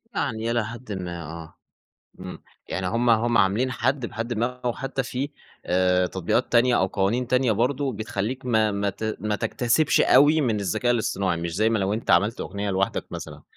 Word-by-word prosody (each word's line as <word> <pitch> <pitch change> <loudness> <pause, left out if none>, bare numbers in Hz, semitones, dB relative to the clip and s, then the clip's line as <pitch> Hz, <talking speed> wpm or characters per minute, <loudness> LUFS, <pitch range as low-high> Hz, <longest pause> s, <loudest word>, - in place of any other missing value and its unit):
يعني 115 +1 -1
إلى 120 -2 0
حدٍ 115 0 -8
ما، 90 -3 -5
آه. 80 +1 -9 0.7
إمم، 90 0 -8 0.3
يعني 95 - -3
هُم 115 +5 +1
هُم 115 +1 +3
عاملين 105 +7 +2
حد 130 -1 0
بحدٍ 115 +3 -5
ما، 115 +2 +1 0.2
أو 120 - +1
حتى 135 +2 -3
في 130 +3 -4 0.4
آآ، 90 0 +2
تطبيقات 95 +7 -1
تانية 120 0 +4
أو 95 - +3
قوانين 100 +6 0
تانية 125 -1 +2
برضه 130 +5 0
بتخلّيك 110 +4 -4
ما 110 -3 +2
ما 100 0 -1
ت 110 +3 -4
ما 105 -1 -1
تكتسبش 120 +8 +1
أوي 145 +4 +5
من 110 -6 0
الذكاء 100 +6 0
الإصطناعي، 100 -5 0
مش 85 -1 -4
زي 110 +2 +2
ما 115 - +1
لو 95 +1 0
أنت 110 -3 -2
عملت 100 +6 +3
أغنية 100 +1 -3
لوحدك 95 +1 -1
مثلًا. - - -8
110 Hz, 185 wpm, -24 LUFS, 95-125 Hz, 0.7 s, أوي